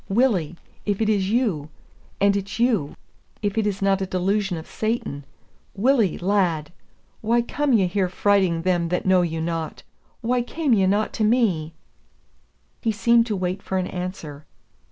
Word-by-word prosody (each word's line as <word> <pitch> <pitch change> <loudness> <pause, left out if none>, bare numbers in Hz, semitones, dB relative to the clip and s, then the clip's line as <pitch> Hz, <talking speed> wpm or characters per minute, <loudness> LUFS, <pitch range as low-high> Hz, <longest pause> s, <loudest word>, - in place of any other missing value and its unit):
"Willie, 195 - +2 0.3
if 205 -2 -1
it 220 -1 +1
is 195 -3 +1
you, 205 - 0 0.5
and 200 0 +4
it's 195 0 -3
you, 230 - +1 0.5
if 205 -1 0
it 220 -2 +1
is 195 -1 -2
not 195 0 +2
a 190 - -1
delusion 190 0 0
of 160 - -7
Satan, 215 -11 -3 0.5
Willie, 225 -2 +2
lad! 175 -5 0 0.5
why 235 +2 +2
come 290 +4 -1
ye 215 -6 +4
here 185 +1 0
frighting 190 -4 +2
them 175 -2 +1
that 180 - -1
know 185 -1 +4
you 165 -2 -2
not? 165 -1 -3 0.4
Why 245 +2 +1
came 285 +2 0
ye 195 -3 +3
not 205 +3 +1
to 220 - -1
me?" 200 -9 +1 1.1
He 225 - +1
seemed 235 +2 +3
to 215 - -1
wait 185 +1 -2
for 190 - -3
an 185 - 0
answer. 170 -6 -6
195 Hz, 165 wpm, -23 LUFS, 180-220 Hz, 1.1 s, and